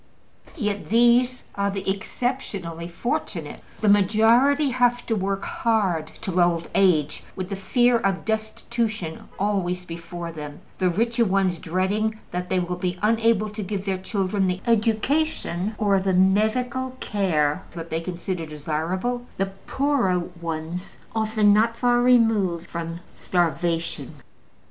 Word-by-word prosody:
Yet 210 Hz, -, -3 dB
these 240 Hz, +3 st, +4 dB
are 200 Hz, 0 st, 0 dB
the 195 Hz, -1 st, -4 dB
exceptionally 190 Hz, -5 st, -3 dB
fortunate: 175 Hz, +8 st, -4 dB, 0.2 s
the 215 Hz, -, +1 dB
majority 225 Hz, +8 st, +4 dB
have 245 Hz, -1 st, +2 dB
to 225 Hz, -, 0 dB
work 195 Hz, -1 st, -1 dB
hard 195 Hz, -9 st, 0 dB
till 190 Hz, -4 st, -1 dB
old 175 Hz, -1 st, +2 dB
age, 155 Hz, -7 st, +2 dB
with 185 Hz, -1 st, -4 dB
the 200 Hz, -, -2 dB
fear 240 Hz, +5 st, +3 dB
of 195 Hz, -3 st, -1 dB
destitution 220 Hz, -4 st, -3 dB
always 185 Hz, -3 st, -1 dB
before 170 Hz, 0 st, -6 dB
them, 150 Hz, 0 st, -8 dB, 0.2 s
the 185 Hz, -1 st, +3 dB
richer 230 Hz, +6 st, +1 dB
ones 190 Hz, -4 st, +1 dB
dreading 205 Hz, +6 st, 0 dB
that 180 Hz, 0 st, -3 dB
they 185 Hz, -, +1 dB
will 180 Hz, 0 st, -1 dB
be 180 Hz, 0 st, -2 dB
unable 225 Hz, -1 st, +2 dB
to 210 Hz, +1 st, -5 dB
give 195 Hz, 0 st, -4 dB
their 190 Hz, -2 st, -1 dB
children 195 Hz, 0 st, 0 dB
the 180 Hz, +1 st, -1 dB
education 225 Hz, -, +1 dB
or 200 Hz, -2 st, +3 dB
the 190 Hz, -1 st, +1 dB
medical 245 Hz, +7 st, +2 dB
care 170 Hz, -5 st, +1 dB
that 165 Hz, -1 st, -7 dB
they 160 Hz, +1 st, -1 dB
consider 175 Hz, -1 st, -4 dB
desirable, 170 Hz, +11 st, -2 dB
the 195 Hz, 0 st, -1 dB, 0.2 s
poorer 270 Hz, -10 st, +2 dB
ones 170 Hz, 0 st, -5 dB, 0.2 s
often 215 Hz, -1 st, +3 dB
not 225 Hz, +2 st, +3 dB
far 245 Hz, 0 st, +3 dB
removed 225 Hz, -9 st, +3 dB
from 170 Hz, 0 st, -5 dB, 0.2 s
starvation. 170 Hz, -1 st, -1 dB
195 Hz, 135 wpm, -24 LUFS, 175-225 Hz, 0.2 s, these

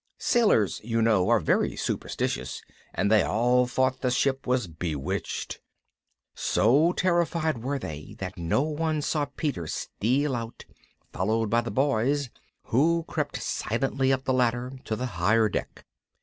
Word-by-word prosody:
Sailors, 210 Hz, -, +2 dB
you 115 Hz, +1 st, -1 dB
know, 110 Hz, -5 st, +3 dB
are -, -, +5 dB
very -, -, +1 dB
superstitious, 65 Hz, +2 st, -3 dB, 0.3 s
and 100 Hz, -, 0 dB
they 110 Hz, -2 st, +6 dB
all 125 Hz, +5 st, +2 dB
thought 130 Hz, +1 st, 0 dB
the 125 Hz, -, +1 dB
ship 135 Hz, +2 st, 0 dB
was 125 Hz, -2 st, +1 dB
bewitched. 80 Hz, -4 st, -4 dB, 0.7 s
So 140 Hz, +10 st, +3 dB
terrified 170 Hz, -6 st, +1 dB
were 140 Hz, +4 st, -2 dB
they 75 Hz, -, -7 dB
that 95 Hz, 0 st, -5 dB
no 85 Hz, +10 st, 0 dB
one 155 Hz, 0 st, -1 dB
saw 150 Hz, 0 st, 0 dB
Peter 140 Hz, -, -3 dB
steal 130 Hz, -, -1 dB
out, 115 Hz, -1 st, -6 dB, 0.5 s
followed 110 Hz, +3 st, 0 dB
by 115 Hz, 0 st, +4 dB
the 120 Hz, -, -5 dB
Boys, 135 Hz, 0 st, +1 dB, 0.3 s
who 165 Hz, +7 st, +2 dB
crept -, -, -3 dB
silently 135 Hz, +3 st, 0 dB
up 130 Hz, 0 st, 0 dB
the 130 Hz, -, 0 dB
ladder 125 Hz, 0 st, +1 dB
to 110 Hz, -, -2 dB
the 125 Hz, -, -3 dB
higher 110 Hz, +2 st, +2 dB
deck. -, -, -5 dB
125 Hz, 145 wpm, -27 LUFS, 110-140 Hz, 0.7 s, they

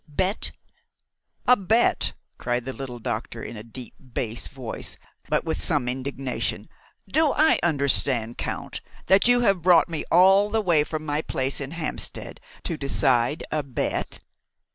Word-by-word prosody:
bet?" 185 Hz, +7 st, -2 dB, 0.9 s
"A 250 Hz, -, +7 dB
bet!" 220 Hz, +3 st, +2 dB, 0.3 s
cried 120 Hz, 0 st, -1 dB
the 130 Hz, -, -4 dB
little 130 Hz, -3 st, -7 dB
doctor 115 Hz, -1 st, -4 dB
in -, -, -7 dB
a 105 Hz, -, -7 dB
deep 115 Hz, +2 st, -10 dB
bass 120 Hz, -3 st, -4 dB
voice, 125 Hz, -4 st, -6 dB, 0.3 s
but -, -, +1 dB
with 160 Hz, -1 st, -3 dB
some 145 Hz, -7 st, +1 dB
indignation. 130 Hz, +1 st, -3 dB, 0.4 s
"Do 310 Hz, -2 st, +2 dB
I 310 Hz, +2 st, +4 dB
understand, 135 Hz, -7 st, +1 dB
Count, -, -, -4 dB, 0.2 s
that 195 Hz, +4 st, +5 dB
you 245 Hz, 0 st, +5 dB
have 195 Hz, -6 st, +2 dB
brought 175 Hz, 0 st, +5 dB
me 165 Hz, -2 st, -3 dB
all 195 Hz, +4 st, +6 dB
the 225 Hz, +1 st, +1 dB
way 170 Hz, -8 st, +3 dB
from 155 Hz, 0 st, -5 dB
my 150 Hz, 0 st, -1 dB
place 135 Hz, -2 st, -2 dB
in 135 Hz, -, -4 dB
Hampstead 165 Hz, -1 st, -3 dB, 0.2 s
to 165 Hz, -, -3 dB
decide 135 Hz, -1 st, +2 dB
a 155 Hz, -, 0 dB
bet?" 135 Hz, -3 st, -3 dB
145 Hz, 150 wpm, -25 LUFS, 125-180 Hz, 0.9 s, A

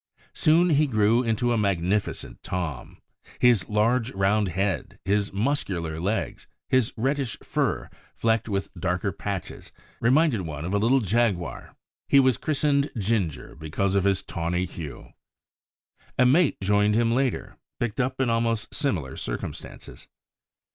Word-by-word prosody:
Soon 170 Hz, +3 st, +4 dB
he 150 Hz, 0 st, +4 dB
grew 110 Hz, -1 st, +3 dB
into 120 Hz, 0 st, 0 dB
a 115 Hz, -, +1 dB
magnificent 100 Hz, 0 st, -1 dB
Tom. 85 Hz, -8 st, -4 dB, 0.4 s
His 120 Hz, -6 st, +3 dB
large, 115 Hz, +3 st, +2 dB
round 100 Hz, +2 st, +2 dB
head, 95 Hz, +1 st, -2 dB
his 100 Hz, +1 st, +1 dB
muscular 95 Hz, -, -2 dB
legs, 100 Hz, +6 st, -2 dB, 0.2 s
his 130 Hz, -3 st, +2 dB
reddish 135 Hz, 0 st, -1 dB
fur, -, -, -1 dB, 0.3 s
flecked 115 Hz, 0 st, +1 dB
with 100 Hz, -1 st, -2 dB
darker 90 Hz, +2 st, -1 dB
patches, 100 Hz, -3 st, -6 dB, 0.3 s
reminded 130 Hz, -, +3 dB
one 80 Hz, -3 st, -5 dB
of 90 Hz, -, -3 dB
a 100 Hz, -, +2 dB
little 125 Hz, +5 st, +3 dB
jaguar. 105 Hz, -4 st, -1 dB, 0.3 s
He 140 Hz, -, +6 dB
was 130 Hz, -4 st, +4 dB
christened 145 Hz, -1 st, +1 dB
Ginger 100 Hz, -7 st, -1 dB
because 80 Hz, +5 st, -2 dB
of 100 Hz, -1 st, +2 dB
his 95 Hz, -1 st, +2 dB
tawny 85 Hz, +2 st, -2 dB
hue. 80 Hz, -5 st, -9 dB, 1.0 s
A 125 Hz, -, +5 dB
mate 145 Hz, +5 st, +4 dB
joined 105 Hz, +2 st, +3 dB
him 115 Hz, 0 st, +2 dB
later, 130 Hz, +1 st, -1 dB, 0.2 s
picked 120 Hz, +1 st, -2 dB
up 130 Hz, +1 st, -1 dB
in 130 Hz, -, +2 dB
almost 115 Hz, -2 st, 0 dB
similar 80 Hz, -, -2 dB
circumstances. -, -, -7 dB
105 Hz, 135 wpm, -25 LUFS, 95-125 Hz, 1.0 s, He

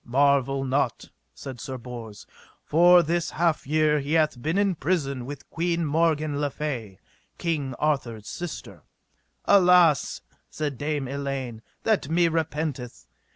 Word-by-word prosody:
Marvel 135 Hz, +1 st, +2 dB
not, 135 Hz, +2 st, -1 dB, 0.2 s
said 130 Hz, -3 st, -9 dB
Sir 130 Hz, -1 st, -5 dB
Bors, 115 Hz, -4 st, -9 dB, 0.4 s
for 175 Hz, +2 st, +6 dB
this 170 Hz, +1 st, -1 dB
half 165 Hz, -4 st, 0 dB
year 155 Hz, 0 st, +2 dB
he 145 Hz, +2 st, -3 dB
hath 155 Hz, -6 st, +2 dB
been 160 Hz, +7 st, -1 dB
in 200 Hz, -1 st, +2 dB
prison 140 Hz, -6 st, -2 dB
with 140 Hz, 0 st, -8 dB
Queen 170 Hz, 0 st, 0 dB
Morgan 155 Hz, -1 st, +1 dB
le 145 Hz, -, +1 dB
Fay, 125 Hz, -10 st, -5 dB, 0.4 s
King 145 Hz, -6 st, -2 dB
Arthur's 120 Hz, -8 st, -2 dB
sister. 175 Hz, -1 st, -7 dB, 0.6 s
Alas, 180 Hz, -6 st, +4 dB, 0.3 s
said 145 Hz, -5 st, -4 dB
Dame 145 Hz, -2 st, -2 dB
Elaine, 135 Hz, -4 st, -4 dB, 0.2 s
that 210 Hz, -10 st, +1 dB
me 170 Hz, +1 st, +3 dB
repenteth. 155 Hz, -6 st, -3 dB
150 Hz, 130 wpm, -25 LUFS, 135-165 Hz, 0.6 s, for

